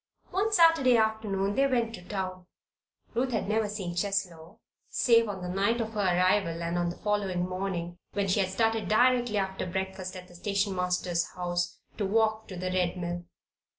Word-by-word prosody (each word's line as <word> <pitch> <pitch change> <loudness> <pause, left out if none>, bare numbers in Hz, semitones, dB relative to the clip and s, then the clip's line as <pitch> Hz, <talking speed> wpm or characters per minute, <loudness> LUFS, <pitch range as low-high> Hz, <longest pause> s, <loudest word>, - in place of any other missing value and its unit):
One 395 +4 +1
Saturday 325 - +5
afternoon 215 -3 0
they 275 +5 +3
went 235 -4 0
to 200 - -8
town. 185 -1 -5 0.7
Ruth 255 +3 0
had 220 - -1
never 215 0 +1
seen 195 -4 -4
Cheslow 180 -4 -2 0.3
save 230 -2 +4
on 190 -3 -5
the - - -3
night 200 +6 +1
of 225 -1 -3
her 215 - -3
arrival 180 -2 +2
and 170 +1 -2
on 175 0 0
the 175 - -5
following 195 -4 -1
morning, 185 -2 -4
when 200 -1 0
she 190 +2 +2
had 190 -2 +1
started 225 +2 +1
directly 245 0 +3
after 190 -1 -2
breakfast 190 0 -4
at 180 0 -9
the 175 - -16
station 200 +2 -1
master's 180 -1 0
house 175 -1 -2 0.2
to 200 - +1
walk 220 +1 +1
to 190 - -7
the 185 +1 -2
Red 180 -1 0
Mill. 175 0 -4
195 Hz, 185 wpm, -29 LUFS, 180-220 Hz, 0.7 s, Saturday